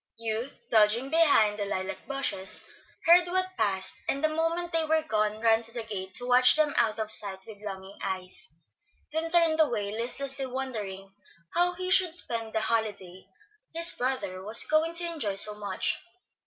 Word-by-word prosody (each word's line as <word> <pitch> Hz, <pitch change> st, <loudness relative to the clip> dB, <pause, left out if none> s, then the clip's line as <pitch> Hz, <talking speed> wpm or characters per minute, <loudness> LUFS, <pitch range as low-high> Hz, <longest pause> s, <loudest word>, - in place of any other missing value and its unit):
Hugh, 230 Hz, +3 st, -4 dB, 0.2 s
dodging 225 Hz, +5 st, +2 dB
behind 255 Hz, -11 st, +3 dB
the 205 Hz, -, -2 dB
lilac 190 Hz, -1 st, -5 dB
bushes, 275 Hz, -9 st, -2 dB, 0.4 s
heard 350 Hz, +1 st, +6 dB
what 370 Hz, +1 st, -1 dB
passed, 190 Hz, -, 0 dB
and 275 Hz, +2 st, -1 dB
the 310 Hz, -, +3 dB
moment 330 Hz, +2 st, -2 dB
they 330 Hz, -1 st, +4 dB
were 315 Hz, 0 st, 0 dB
gone 215 Hz, -5 st, -1 dB
ran 225 Hz, -1 st, +3 dB
to 230 Hz, 0 st, +1 dB
the 235 Hz, -1 st, -5 dB
gate 190 Hz, -4 st, -7 dB
to 245 Hz, -, +3 dB
watch 250 Hz, 0 st, +5 dB
them 305 Hz, -1 st, +1 dB
out 225 Hz, -2 st, +1 dB
of 215 Hz, -1 st, -4 dB
sight 190 Hz, -2 st, 0 dB
with 210 Hz, -2 st, -12 dB
longing 195 Hz, -1 st, -8 dB
eyes, 185 Hz, -1 st, -2 dB, 0.6 s
then 320 Hz, +2 st, -3 dB
turned 330 Hz, -2 st, +2 dB
away, 220 Hz, -10 st, 0 dB
listlessly 265 Hz, +4 st, -2 dB
wondering 210 Hz, -7 st, -6 dB, 0.4 s
how 355 Hz, +1 st, +3 dB
he 365 Hz, +1 st, -4 dB
should 365 Hz, -3 st, +5 dB
spend 230 Hz, -9 st, +1 dB
the 220 Hz, -, 0 dB
holiday 205 Hz, -5 st, -2 dB, 0.5 s
his 335 Hz, +1 st, +6 dB
brother 245 Hz, -8 st, -3 dB
was 215 Hz, +3 st, +5 dB
going 320 Hz, +2 st, 0 dB
to 345 Hz, +1 st, +5 dB
enjoy 285 Hz, -13 st, -3 dB
so 210 Hz, +2 st, +4 dB
much. 205 Hz, -2 st, -3 dB
230 Hz, 170 wpm, -27 LUFS, 210-315 Hz, 0.6 s, heard